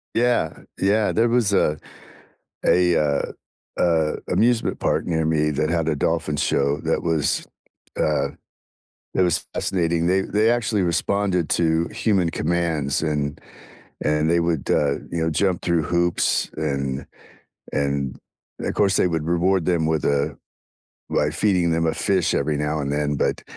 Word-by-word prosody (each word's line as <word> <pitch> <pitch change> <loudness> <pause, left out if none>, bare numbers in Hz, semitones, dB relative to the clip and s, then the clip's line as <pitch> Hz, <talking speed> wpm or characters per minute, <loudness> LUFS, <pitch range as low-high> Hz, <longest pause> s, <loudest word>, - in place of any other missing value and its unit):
Yeah, 120 -9 +1 0.2
yeah, 105 +2 +2
there 115 +2 +2
was 115 -4 +2
a 75 -5 +2 0.9
a, 90 -1 +4
uh 70 -2 0 0.5
uh, 80 -3 +2
amusement 120 0 +1
park - - 0
near 80 -2 0
me 80 -1 +1
that 75 +1 -1
had 85 -2 0
a 75 - 0
dolphin 80 0 -1
show 70 0 +1
that - - 0
was, 80 -4 0 0.5
uh 70 -2 +1 0.9
that 95 - +4
was 90 -2 +1
fascinating. 85 -2 0
They 95 +2 +3
they 105 +4 +2
actually 110 -4 0
responded 90 0 0
to 80 0 +2
human 95 -6 +1
commands, 80 -4 -1
and 75 -2 -2 0.7
and 75 +1 +1
they 85 0 +3
would, 85 -4 -1
uh, 70 -1 +2 0.2
you 85 - -2
know, 80 - +1
jump 90 +3 0
through 85 -2 +1
hoops, 85 +2 +1
and 70 -3 -2 0.7
and, 70 -2 -1 0.4
of - - -2
course, 95 -3 +2
they - - +3
would 80 -3 -2
reward 85 +2 +1
them 85 -3 +1
with 80 -2 0
a 70 0 0 0.7
by 75 - +1
feeding 90 +1 +1
them 80 0 +1
a 80 - +1
fish 95 -4 +1
every 75 +1 0
now 75 +1 -1
and 70 -1 -2
then, 75 0 0
but - - -1
80 Hz, 155 wpm, -22 LUFS, 75-90 Hz, 0.9 s, a